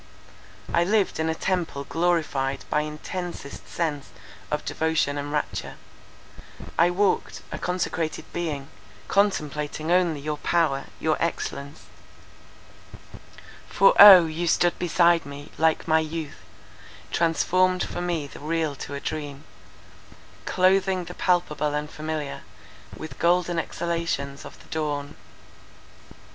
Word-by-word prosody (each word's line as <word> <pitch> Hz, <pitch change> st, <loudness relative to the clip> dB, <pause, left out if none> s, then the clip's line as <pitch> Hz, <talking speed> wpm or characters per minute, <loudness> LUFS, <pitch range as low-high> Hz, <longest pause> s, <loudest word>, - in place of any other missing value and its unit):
I 170 Hz, -, +4 dB
lived 200 Hz, 0 st, +1 dB
in 160 Hz, 0 st, 0 dB
a 160 Hz, -, 0 dB
temple 170 Hz, -6 st, -2 dB
glorified 155 Hz, -5 st, 0 dB
by 150 Hz, -, +3 dB
intensest 150 Hz, 0 st, -6 dB
sense 150 Hz, -5 st, -3 dB, 0.4 s
of 150 Hz, -, -2 dB
devotion 160 Hz, -3 st, 0 dB
and 145 Hz, 0 st, -4 dB
rapture; 150 Hz, 0 st, -3 dB, 1.0 s
I 170 Hz, +1 st, +4 dB
walked, 190 Hz, +2 st, 0 dB
a -, -, -5 dB
consecrated 175 Hz, -3 st, -2 dB
being, 150 Hz, -5 st, -3 dB, 0.4 s
contemplating 155 Hz, -5 st, 0 dB
only 175 Hz, -4 st, +3 dB
your 150 Hz, +1 st, -4 dB
power, 155 Hz, -6 st, +1 dB
your 155 Hz, -1 st, +1 dB
excellence; 145 Hz, -3 st, -3 dB, 1.9 s
For -, -, +5 dB
O, 190 Hz, -4 st, +11 dB
you 165 Hz, +2 st, -3 dB
stood 175 Hz, +1 st, +2 dB
beside 170 Hz, -1 st, +3 dB
me, 145 Hz, +1 st, -10 dB
like 160 Hz, +1 st, +2 dB
my 160 Hz, 0 st, +4 dB
youth, 160 Hz, -1 st, -5 dB, 0.7 s
Transformed 185 Hz, +2 st, +2 dB
for -, -, -4 dB
me 170 Hz, -4 st, -1 dB
the 140 Hz, -, -11 dB
real 155 Hz, 0 st, -1 dB
to 140 Hz, -, -6 dB
a -, -, -4 dB
dream, 145 Hz, -2 st, -5 dB, 1.0 s
Cloathing 185 Hz, 0 st, +2 dB
the 175 Hz, -, -8 dB
palpable 150 Hz, -5 st, 0 dB
and 150 Hz, 0 st, -2 dB
familiar 155 Hz, -2 st, -4 dB, 0.6 s
With 155 Hz, -4 st, -9 dB
golden 175 Hz, 0 st, +2 dB
exhalations 165 Hz, -5 st, -3 dB
of -, -, -11 dB
the -, -, -20 dB
dawn. 145 Hz, -2 st, -3 dB
160 Hz, 120 wpm, -25 LUFS, 150-175 Hz, 1.9 s, O